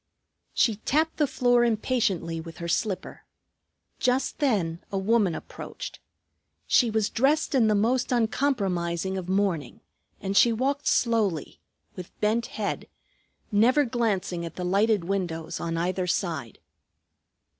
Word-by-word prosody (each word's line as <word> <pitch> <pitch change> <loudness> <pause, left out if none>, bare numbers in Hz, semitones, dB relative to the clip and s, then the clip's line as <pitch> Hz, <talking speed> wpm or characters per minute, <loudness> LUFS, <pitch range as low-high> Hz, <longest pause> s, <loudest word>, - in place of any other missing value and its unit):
She 225 -4 +3
tapped 315 +8 0
the 295 - +2
floor 245 -3 +3
impatiently 215 -8 0
with 165 0 -10
her 170 - -5
slipper. 190 +3 -2 0.8
Just 255 +3 0
then 195 - +1
a 195 - -1
woman 195 -3 +2
approached. - - -8 0.7
She 240 - +4
was 220 -1 +1
dressed 290 +6 +1
in 245 -5 +4
the 215 - +3
most 240 +5 +1
uncompromising 195 -8 0
of 185 -1 -5
mourning, 185 -9 0 0.4
and 195 +1 -3
she 235 - +6
walked 275 +5 -1
slowly, 215 - +1 0.4
with 180 -2 -10
bent 220 +3 +1
head, - - -4 0.6
never 240 +8 +4
glancing 210 -8 -1
at 165 -1 -7
the 180 - -4
lighted 200 +1 +2
windows 175 -4 -3
on 165 -1 -3
either 180 +2 -1
side. 160 - -2
205 Hz, 130 wpm, -26 LUFS, 175-240 Hz, 0.8 s, she